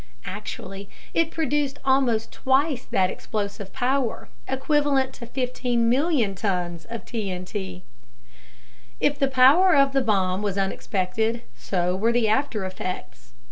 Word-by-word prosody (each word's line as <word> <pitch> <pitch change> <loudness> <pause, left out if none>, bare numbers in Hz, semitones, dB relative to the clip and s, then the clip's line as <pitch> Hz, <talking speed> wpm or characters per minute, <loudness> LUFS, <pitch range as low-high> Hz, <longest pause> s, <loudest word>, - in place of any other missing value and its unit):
Actually, 195 0 -7 0.2
it 330 -1 +2
produced 295 -3 -1
almost 260 -5 +2
twice 270 0 +1
that 185 -1 +1
explosive 200 -2 -4
power 255 -1 -1 0.2
equivalent 270 -1 +1
to 235 - -9
15 250 -2 0
million 255 - +2
tons 180 -4 -2
of 230 -1 -7
TNT. 190 -3 -5 1.2
If 290 0 +1
the 275 - +3
power 275 +8 +6
of 275 -1 +4
the 270 - +3
bomb 195 -5 +1
was 200 -2 -2
unexpected, 200 +3 -1
so 175 +9 -1
were 220 +5 +2
the 235 -2 +2
after 220 -2 0
effects. 185 - -6
230 Hz, 125 wpm, -24 LUFS, 195-270 Hz, 1.2 s, power